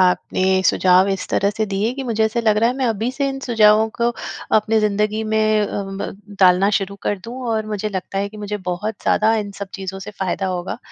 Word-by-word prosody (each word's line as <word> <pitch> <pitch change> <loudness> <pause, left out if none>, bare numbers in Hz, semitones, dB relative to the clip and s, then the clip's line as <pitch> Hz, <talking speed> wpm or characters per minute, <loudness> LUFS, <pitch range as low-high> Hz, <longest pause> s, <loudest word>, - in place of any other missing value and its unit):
आपने 185 +1 +2
सुझाव 185 +1 +4
इस 195 -1 -2
तरह 200 - +1
से 220 +1 -1
दिए 205 +4 -1
कि 275 - -4
मुझे 220 -2 +1
ऐसा 220 +2 0
लग 215 -2 +2
रहा 230 +2 +3
है 250 - -1
मैं 265 - -1
अभी 225 +2 -1
से 280 +1 -1
इन 270 - -4
सुझावों 220 -2 +5
को 235 0 +2 0.5
अपनी 220 +1 +2
ज़िंदगी 210 +1 0
में 215 0 +2
अ, - - 0 0.2
ब 195 +1 -7
डालना 185 +2 +5
शुरू 200 0 -3
कर 205 - -1
दूँ 235 +2 -7
और 220 -1 -1
मुझे 215 0 -3
लगता 195 -1 -4
है 200 +1 -1
कि 215 - -13
मुझे 210 0 -4
बहुत 210 +5 -2
ज़्यादा 220 +1 +3
इन 205 -2 -3
सब 200 -1 -5
चीज़ों 190 0 -5
से 200 +2 -8
फ़ायदा 190 -1 -2
होगा, 180 -1 -3
210 Hz, 225 wpm, -20 LUFS, 195-220 Hz, 0.5 s, सुझावों